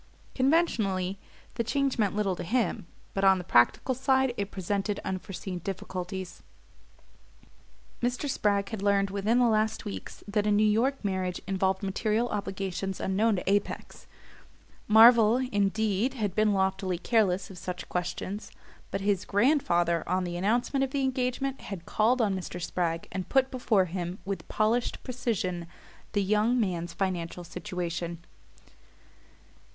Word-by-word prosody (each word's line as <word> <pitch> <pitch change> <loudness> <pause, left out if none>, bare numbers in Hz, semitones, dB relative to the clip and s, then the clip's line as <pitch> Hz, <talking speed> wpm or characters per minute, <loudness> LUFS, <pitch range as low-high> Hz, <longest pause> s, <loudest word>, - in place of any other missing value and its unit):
Conventionally 215 - +1 0.3
the 235 - -1
change 275 +2 0
meant 205 -2 +1
little 200 -3 0
to - - -6
him; 220 -2 -1 0.3
but 195 - -1
on 190 -1 +6
the 180 - -5
practical 145 - +3
side 265 0 +2
it 200 -3 -3
presented 200 +2 -2
unforeseen 185 -1 -4
difficulties. 185 0 -5 1.6
Mr. 245 +4 -1
Spragg 200 -6 +1
had 220 -4 -5
learned 200 -1 +2
within 205 +4 +1
the 250 - +5
last 215 -1 +1
weeks 95 -2 -7
that 210 0 0
a - - +3
New 210 +1 +4
York 230 +4 +1
marriage 185 -2 -1
involved 190 0 0
material 215 +4 0
obligations 195 -2 -3
unknown 210 +3 +2
to 180 - -5
Apex. 200 +1 -1 0.8
Marvell, 225 +1 +7
indeed, 210 +4 +1
had 210 -6 -2
been 215 +1 +3
loftily 190 -2 0
careless 195 -2 +1
of 180 - -10
such 180 +1 -5
questions; 185 +3 -4 0.4
but 195 - -3
his 200 -1 +1
grandfather, 195 - +2
on 185 0 +1
the 175 -1 -4
announcement 240 +9 +1
of 270 - 0
the 275 +1 -1
engagement, 260 +1 -1
had 185 -5 -7
called 235 +3 +2
on 200 -3 +1
Mr. 180 -1 -5
Spragg 170 -1 -2
and 185 -1 -4
put 265 -1 +3
before 230 -7 +2
him, 175 +1 -4
with 195 0 -4
polished 225 +3 0
precision, 200 -9 -2 0.5
the 205 -2 +2
young 215 +5 +2
man's 175 -5 -1
financial 180 -2 -3
situation. 170 -1 -4 0.5
Mr. - - -24
200 Hz, 145 wpm, -28 LUFS, 185-230 Hz, 1.6 s, Marvell